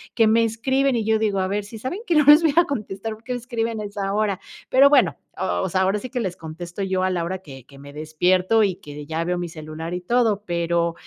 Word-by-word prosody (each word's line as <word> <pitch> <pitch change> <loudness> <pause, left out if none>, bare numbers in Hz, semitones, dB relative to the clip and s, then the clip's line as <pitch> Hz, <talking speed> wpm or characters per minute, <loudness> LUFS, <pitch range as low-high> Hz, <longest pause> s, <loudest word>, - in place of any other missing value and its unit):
que 225 -2 +4
me 230 +1 +4
escriben, 265 +4 +1
y 225 - 0
yo 220 0 +2
digo: 205 -3 0
"A 185 - 0
ver, 205 0 -2
sí 220 +2 -9
saben 260 - -4
que 340 - +2
no 300 - +5
les 295 +3 +9
voy 315 -4 +2
a 345 - +6
contestar, 220 - -4
¿por 220 - -21
qué 250 - -3
me 245 - -3
escriben 230 -2 -3
a - - -4
esa 200 -1 -3
hora?". 205 -2 0 0.3
Pero 270 +2 +6
bueno, 290 - +4 0.2
o - - -1
o 190 - -1
sea, 190 +2 +1
ahora 190 +2 +2
sí 250 +4 -7
que 250 - -2
les 185 -6 -3
contesto 170 +4 -7
yo 185 -1 -1
a 185 - +1
la 175 -2 -1
hora 185 +2 -3
que 135 -8 -12
que 140 0 -16
me 140 0 -11
despierto, 180 +8 +1
y 195 -3 +1
que 150 -3 -10
ya 165 +1 -2
veo 180 +1 -1
mi 175 -1 -4
celular 155 +1 -7
y 180 - -4
todo. 220 0 +1
Pero 170 -1 0
195 Hz, 270 wpm, -22 LUFS, 170-230 Hz, 0.3 s, les